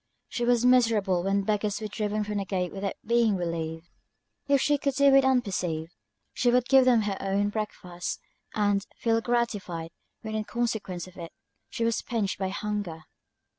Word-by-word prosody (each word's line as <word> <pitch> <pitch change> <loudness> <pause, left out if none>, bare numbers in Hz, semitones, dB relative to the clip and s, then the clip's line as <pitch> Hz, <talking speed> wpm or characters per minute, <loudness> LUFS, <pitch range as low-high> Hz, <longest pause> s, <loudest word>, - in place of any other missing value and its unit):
She 240 - -2
was 245 0 +3
miserable 225 -7 +4
when 195 +2 +1
beggars 210 0 0
were 220 - -5
driven 210 0 -2
from 210 0 -2
the 200 - -3
gate 180 -2 -2
without 195 0 -3
being 235 -2 +3
relieved; 165 -2 -3 0.6
if 280 -1 +4
she 290 +2 +2
could 280 -1 -1
do 280 0 +5
it 275 0 +7
unperceived, 185 -11 0 0.4
she 245 - +2
would 250 0 +3
give 265 -1 +6
them 240 -4 +4
her 200 -2 -2
own 200 +1 +1
breakfast, 185 -5 -4 0.4
and 205 -2 +2
feel 225 -1 +1
gratified, 205 -9 -2 0.3
when, 220 -1 -5
in 215 -1 -2
consequence 220 -8 -2
of 185 0 -15
it, 170 -2 -7 0.4
she 230 - -2
was 230 -1 +1
pinched 215 -6 -2
by 190 -1 -1
hunger. 205 -5 -4
210 Hz, 170 wpm, -27 LUFS, 190-235 Hz, 0.6 s, it